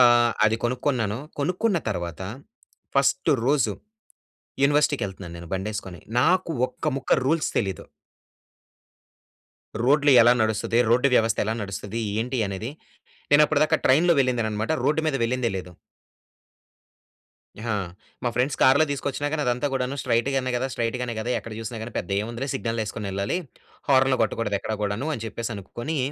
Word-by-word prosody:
ఆహ్, 120 -1 +6
అది 110 +1 +2
కొనుక్కున్నాను. 120 -3 0 0.2
కొనుక్కున్న 180 +6 +1
తర్వాత 85 -2 -4 0.7
ఫస్ట్ - - +3 0.2
రోజు 135 -7 +2 0.9
యూనివర్సిటీకెళ్తున్నాను 100 - +1
నేను 85 -1 -10
బండేసుకొని. 95 -2 -4 0.2
నాకు 180 +5 +2 0.2
ఒక్కముక్క 135 -1 -3
రూల్స్ 155 +3 +1
తెలీదు. 95 -4 -2 2.0
రోడ్లు 145 +2 +4
ఎలా 120 +1 +6
నడుస్తది, 110 +1 0
రోడ్డు 125 +4 +4
వ్యవస్థ 115 -1 +3
ఎలా 110 - 0
నడుస్తది, 105 +3 -5 0.2
ఏంటి 125 +2 -2
అనేది 100 +6 -4 0.6
నేనప్పటి 150 0 +5
దాకా - - +2
ట్రైన్‌లో 165 +6 +5
వెళ్ళిందేననమాట. 115 -3 0
రోడ్డు 150 +3 +2
మీద 150 - +1
వెళ్ళిందే 120 0 0
లేదు. 90 -1 -7 1.9
హా! 115 - 0 0.5
మా - - +2
ఫ్రెండ్స్ 130 +3 0
కార్‌లో 140 +4 +6
తీసుకొచ్చినా 140 +1 -2
గానీ 155 -2 0
అదంతా 125 +3 0
కూడాను 130 +1 -1
స్ట్రయిట్ 120 0 +1
గానే 130 -1 0
కదా 130 - -1
స్ట్రయిట్ 115 +1 -1
గానే 120 -2 -3
కదా! 120 +3 -3
ఎక్కడ 115 - -9
చూసినా 115 +1 -5
గాని 115 0 -7
పెద్ద 90 - -5
ఏముందిలే 120 +5 -4
సిగ్నల్ 115 -3 -2
ఏసుకొనెళ్ళాలి. 100 - -3 0.5
హార్న్‌లు 130 -1 +4
కొట్టకూడదు 110 -1 0
ఎక్కడ 110 - -3
గూడాను 105 +9 -2
అని 115 - -6
చెప్పేసి 115 +1 -4
అనుకొని 120 - -5
120 Hz, 135 wpm, -25 LUFS, 110-140 Hz, 2.0 s, ఆహ్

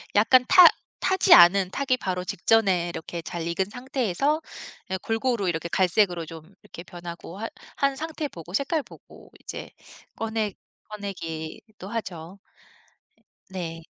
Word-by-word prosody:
약간 250 +5 +5
타 360 - +9 0.3
타지 380 -1 +4
않은, 180 +2 +7
타기 265 +1 0
바로 185 -5 -3
직전에 190 -2 +2
이렇게 170 0 -6
잘 170 -1 -5
익은 170 +3 0
상태에서 260 - -1 0.5
예 190 - 0
골고루 225 0 -1
이렇게 165 0 -2
갈색으로 180 -1 +2
좀 160 -1 -9 0.2
이렇게 170 - -11
변하고 175 0 -9
하 225 - -3 0.3
한 275 -1 +1
상태 315 +1 -4
보고 170 - -11
색깔 280 - 0
보고 - - -16
이제 - - -8 0.4
꺼내 220 -2 -2 0.4
꺼내기도 195 -1 -7
하죠. 185 -5 -6 1.1
네. 170 -3 -6
195 Hz, 270 characters per minute, -25 LUFS, 175-235 Hz, 1.1 s, 타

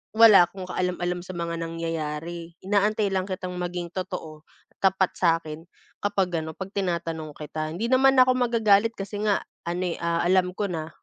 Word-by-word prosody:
wala 215 -6 +8
akong 185 -1 -9
kaalam-alam 180 -1 -1
sa 185 - -7
mga 170 0 -3
nangyayari, 165 0 -4
inaantay 205 +1 +2
lang 190 -1 0
kitang 185 -1 -5
maging 175 -1 -3
totoo, 160 -4 -6 0.3
tapat 190 -1 +2
sa 165 -2 +3
akin, 155 +2 -8 0.3
kapag 190 -4 0
ano 160 - -6
'pag 190 +3 -7
tinatanong 165 -5 -3
kita 155 +1 -5
hindi 225 +7 -2
naman 265 +1 +5
ako 255 0 +4
magagalit 230 -2 +3
kasi 200 +1 -6
nga 205 -2 +2 0.2
ano 175 +1 -2
eh, - - -10
ah, 170 0 0
alam 180 +1 +2
ko 200 +1 -2
na. 160 -3 -4
180 Hz, 170 wpm, -25 LUFS, 165-200 Hz, 0.3 s, wala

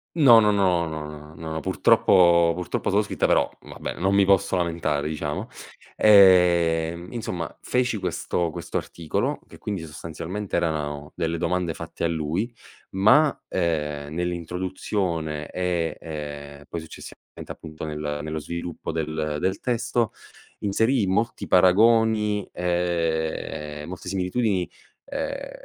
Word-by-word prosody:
No, 130 -8 +8
no, 105 -1 +4
no, 90 -4 +2
no, 75 0 -7
n - - -15
no, 80 0 -3
purtroppo 85 +2 +4
purtroppo 90 -1 -2
solo - - +3
scritte, - - 0
però - - +3
vabbè - - -7
non 95 +2 +2
mi 100 -1 +5
posso 100 -1 +3
lamentare, 80 -4 -1
diciamo. 75 -1 -3 0.5
Ehm, 85 -4 +5
insomma, 90 -9 -4
feci 125 -3 0
questo 85 -2 -1
questo - - -4
articolo, 85 -3 -2
che - - -15
quindi 100 -6 -4
sostanzialmente 85 +6 -6
erano 75 -3 -2
delle 85 -1 -1
domande 90 -1 -1
fatte 85 0 -7
a 85 - +3
lui, 85 +8 -2 0.4
ma, 125 +11 +4
ehm, 75 -4 -2
nell'introduzione 90 -2 -2
e, 90 -3 -1
ehm, 75 -2 -7
poi, 85 - -5
successivamente 80 - -11
appunto 80 -1 -8
nel 75 -1 -4
nello 80 0 -3
sviluppo 85 +1 -5
del 80 -1 -2
del 95 +1 -1
testo, 120 -1 0 0.5
inserii 110 +3 +2
molti 105 +5 -1
paragoni, 105 +2 +4
ehm, 80 -3 -2
molte 90 0 -7
similitudini, 95 0 0 0.4
ehm, - - -4
85 Hz, 125 wpm, -24 LUFS, 80-95 Hz, 0.5 s, No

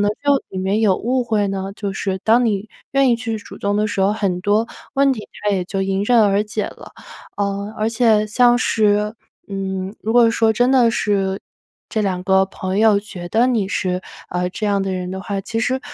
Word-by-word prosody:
能 205 0 +2
就 285 -1 +3
里 190 - -6
面 195 +3 0
有 200 -4 +3
误 250 +2 0
会 215 -3 +1
呢？ 195 0 -4
就 200 -2 -3
是 190 -1 -2
当 235 +3 +4
你 210 -2 -1 0.2
愿 275 -1 +4
意 - - +4
去 225 -1 -4
主 205 - -12
动 200 0 0
的 210 +1 +1
时 205 - -2
候， 195 +2 +3
很 195 -4 -1
多 210 +4 +1 0.3
问 275 0 +4
题 215 -5 -7 0.2
它 210 - +2
也 190 -3 0
就 195 +2 -3
迎 195 0 -1
刃 240 +1 +4
而 200 0 +3
解 210 0 -3
了。 - - -10 0.5
呃， 200 +1 -2
而 215 +1 +1
且 225 -2 +3
像 240 +3 +4
是， 210 -2 +1 0.3
嗯， 190 0 -4
如 220 - -2
果 240 -1 +6
说 225 -1 +2
真 245 +3 +2
的 245 -3 +5
是 195 -3 0 0.5
这 220 - -1
2 190 -3 -1
个 190 0 +4
朋 190 0 -4
友 215 -2 +5
觉 185 -4 -9
得 230 +6 +3
你 225 -6 0
是， 185 -1 -1 0.3
呃， 180 0 -1
这 210 +3 -3
样 200 -1 +1
的 195 - -2
人 180 -1 -3
的 190 +1 -5
话， 200 -1 -3
其 225 +3 -3
实， 255 +3 0
205 Hz, 230 characters per minute, -20 LUFS, 195-225 Hz, 0.5 s, 果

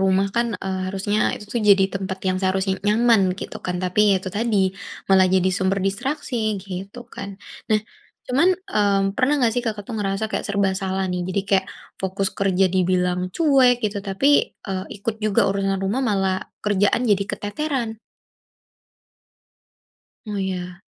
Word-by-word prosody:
rumah 195 +1 +3
kan, 235 0 +3 0.2
eee, 190 -1 -2
harusnya 195 +2 -1 0.2
itu 210 +3 -7
jadi 195 -1 +7
tempat 190 0 -3
yang 185 - +1
seharusnya 190 0 +1
nyaman 225 0 +4 0.2
gitu - - -6
kan. 180 -1 -1
Tapi 180 +3 +1
ya 200 - +5
itu 190 - -5
tadi, 225 0 +1 0.5
malah 190 -1 +6
jadi 185 - +3
sumber 195 0 +1
distraksi 225 0 -2
gitu 195 +3 -7 0.2
kan. 200 - -6 0.4
Nah, 215 -1 +3 0.5
cuman, 275 +8 +3 0.2
mmm, 200 -1 +2
pernah 265 +2 +2
nggak 245 -5 +2
sih 245 - 0
Kakak 215 -3 -3
tuh - - -7
ngerasa 195 +1 -1
kayak - - -2
serba 200 -1 +1
salah 190 0 -1
nih, 180 - -2
jadi 190 +2 0
kayak 190 -1 +2 0.3
fokus 190 0 -1
kerja 195 -1 +2
dibilang 180 -1 +1 0.2
cuek 270 -6 +5
gitu, 205 -1 -1
tapi, 195 +8 0 0.4
eee, 190 -1 -2
ikut 205 +2 -3
juga 210 -2 +2
urusan 195 0 0
rumah 210 +7 0
malah 195 -2 +1 0.3
kerjaan 205 +3 +2
jadi 200 -1 +3
keteteran? 235 0 -3 2.3
Oh, 210 -1 -4
iya. 180 -1 -4
195 Hz, 155 wpm, -22 LUFS, 190-215 Hz, 2.3 s, jadi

